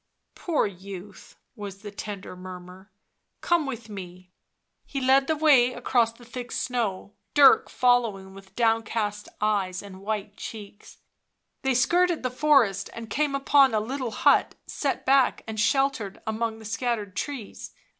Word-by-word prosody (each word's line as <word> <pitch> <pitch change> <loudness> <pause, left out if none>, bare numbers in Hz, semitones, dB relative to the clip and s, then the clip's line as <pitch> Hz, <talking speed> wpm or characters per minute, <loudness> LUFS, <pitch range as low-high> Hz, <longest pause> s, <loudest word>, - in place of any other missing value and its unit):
" - - -53
Poor 335 -4 0
youth," 195 0 -9 0.2
was 200 -2 -8
the 205 - -7
tender 200 -2 -7
murmur. 185 +1 -11 0.2
" - - -52
Come 340 -4 +1
with 235 -4 -6
me." 185 -3 -10 0.5
He 275 - -5
led 270 +1 +4
the 315 - +1
way 275 -5 +5
across 240 -2 +1
the 240 +1 -17
thick 245 0 -7
snow, 215 -5 -2 0.2
Dirk 285 -2 +7
following 230 -6 +1
with 195 0 -15
downcast 225 -2 0
eyes 200 -3 0
and 190 -2 -11
white 210 0 -4
cheeks. 205 -2 -10 0.6
They 265 -1 +1
skirted 345 +5 +2
the 255 - -1
forest 250 -8 +3
and 230 -2 -8
came 290 +1 0
upon 275 -3 +4
a - - +3
little 255 +3 -3
hut, 215 - +3
set 280 -2 -3
back 270 -1 +3
and 220 -1 -5
sheltered 265 -4 +1
among 220 0 -2
the 220 - -13
scattered 220 -3 -2
trees. 265 -6 -5
225 Hz, 150 wpm, -26 LUFS, 200-260 Hz, 0.6 s, Dirk